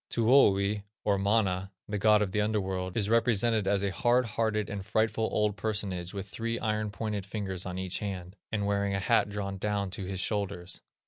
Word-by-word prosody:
Tuoni, 105 Hz, -4 st, +4 dB, 0.2 s
or 100 Hz, -2 st, +2 dB
Mana, 100 Hz, -2 st, +1 dB, 0.2 s
the 105 Hz, 0 st, -2 dB
god 105 Hz, 0 st, +5 dB
of 95 Hz, -, -3 dB
the 105 Hz, -, +1 dB
under 105 Hz, 0 st, +1 dB
world, 95 Hz, -1 st, -3 dB
is 105 Hz, -3 st, +1 dB
represented 115 Hz, -2 st, +3 dB
as 100 Hz, 0 st, +2 dB
a 100 Hz, -, 0 dB
hard 120 Hz, +5 st, +2 dB
hearted, 110 Hz, -2 st, 0 dB
and 100 Hz, -2 st, -5 dB
frightful, 110 Hz, +2 st, +1 dB
old 105 Hz, -1 st, +1 dB
personage 100 Hz, -5 st, -2 dB
with 100 Hz, -1 st, -5 dB
three 115 Hz, +3 st, -3 dB
iron 110 Hz, -1 st, -1 dB
pointed 105 Hz, -1 st, -3 dB
fingers 95 Hz, -2 st, -4 dB
on 90 Hz, 0 st, -4 dB
each 95 Hz, -1 st, -2 dB
hand, 95 Hz, -3 st, -5 dB, 0.2 s
and 105 Hz, -2 st, 0 dB
wearing 100 Hz, -1 st, +1 dB
a -, -, 0 dB
hat 100 Hz, -, +2 dB
drawn 100 Hz, -1 st, -4 dB
down 100 Hz, -1 st, -1 dB
to 95 Hz, 0 st, -4 dB
his 95 Hz, 0 st, -4 dB
shoulders. 100 Hz, -3 st, -2 dB
100 Hz, 195 wpm, -29 LUFS, 95-110 Hz, 0.2 s, god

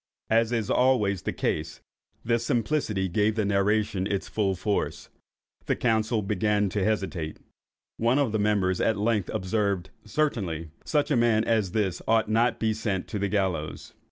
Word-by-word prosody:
As 115 Hz, +1 st, +3 dB
is 115 Hz, -4 st, -1 dB
always 105 Hz, -8 st, +2 dB
the -, -, -2 dB
case, -, -, -2 dB, 0.5 s
this 115 Hz, 0 st, +1 dB
simplicity 115 Hz, -5 st, 0 dB
gave 105 Hz, +4 st, +1 dB
the 110 Hz, -2 st, 0 dB
narration 100 Hz, -1 st, +1 dB
its 100 Hz, -, -2 dB
full 100 Hz, -3 st, 0 dB
force. 100 Hz, +3 st, -2 dB, 0.6 s
The -, -, +2 dB
council 110 Hz, -2 st, +1 dB
began 105 Hz, 0 st, +1 dB
to 100 Hz, +1 st, -1 dB
hesitate. 95 Hz, -7 st, -2 dB, 0.6 s
One 120 Hz, +4 st, +2 dB
of 140 Hz, -6 st, +2 dB
the 110 Hz, -, 0 dB
members 100 Hz, -3 st, +1 dB
at 110 Hz, -, +2 dB
length 105 Hz, -2 st, 0 dB
observed—"Certainly 100 Hz, -, -2 dB
such 150 Hz, -1 st, +1 dB
a -, -, +4 dB
man 115 Hz, -2 st, +3 dB
as 110 Hz, -6 st, 0 dB
this 95 Hz, -5 st, 0 dB
ought 110 Hz, -1 st, +3 dB
not 115 Hz, +2 st, +3 dB
to -, -, -4 dB
be 110 Hz, -, +2 dB
sent 105 Hz, -4 st, -2 dB
to 105 Hz, -, -3 dB
the 100 Hz, 0 st, 0 dB
gallows." 95 Hz, -7 st, -2 dB
105 Hz, 160 wpm, -26 LUFS, 95-115 Hz, 0.6 s, a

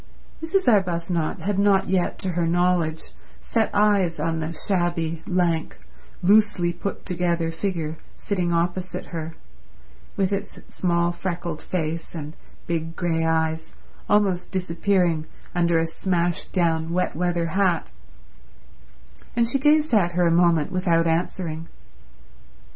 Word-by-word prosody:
Mrs. 375 Hz, +4 st, 0 dB
Arbuthnot 175 Hz, -6 st, +1 dB
had 195 Hz, +3 st, -1 dB
not 200 Hz, -1 st, +3 dB
yet 180 Hz, -1 st, 0 dB
to 190 Hz, -, -2 dB
her 170 Hz, -1 st, 0 dB
knowledge 175 Hz, -2 st, +1 dB, 0.3 s
set 225 Hz, -2 st, 0 dB
eyes 200 Hz, -6 st, +2 dB
on 165 Hz, +1 st, -1 dB
the 160 Hz, +1 st, -3 dB
shabby, 170 Hz, -2 st, -1 dB
lank, 175 Hz, -3 st, 0 dB, 0.5 s
loosely 200 Hz, -3 st, +4 dB
put 185 Hz, +4 st, -5 dB
together 170 Hz, -2 st, 0 dB
figure 165 Hz, -3 st, -3 dB, 0.2 s
sitting 180 Hz, -4 st, -1 dB
opposite 175 Hz, +2 st, -1 dB
her, 165 Hz, 0 st, -5 dB, 0.8 s
with 195 Hz, 0 st, +1 dB
its 200 Hz, -, -4 dB, 0.2 s
small 170 Hz, -1 st, +1 dB
freckled 175 Hz, -2 st, -4 dB
face 165 Hz, -1 st, -3 dB
and 155 Hz, 0 st, -6 dB, 0.3 s
big 165 Hz, -1 st, -3 dB
grey 165 Hz, -2 st, 0 dB
eyes 160 Hz, 0 st, 0 dB, 0.4 s
almost 195 Hz, -4 st, +2 dB
disappearing 180 Hz, -3 st, +1 dB, 0.3 s
under 170 Hz, -1 st, +2 dB
a 165 Hz, -, +2 dB
smashed 175 Hz, +1 st, -1 dB
down 165 Hz, -3 st, +1 dB
wet 180 Hz, -2 st, 0 dB
weather 175 Hz, 0 st, 0 dB
hat, 185 Hz, -4 st, +2 dB, 1.5 s
and 235 Hz, -1 st, +3 dB
she 270 Hz, +4 st, 0 dB
gazed 300 Hz, 0 st, +3 dB
at 175 Hz, -5 st, +3 dB
her 175 Hz, 0 st, +2 dB
a 170 Hz, -, +3 dB
moment 170 Hz, -3 st, +3 dB
without 170 Hz, -3 st, +2 dB
answering. 165 Hz, -1 st, -1 dB
175 Hz, 125 wpm, -24 LUFS, 165-190 Hz, 1.5 s, loosely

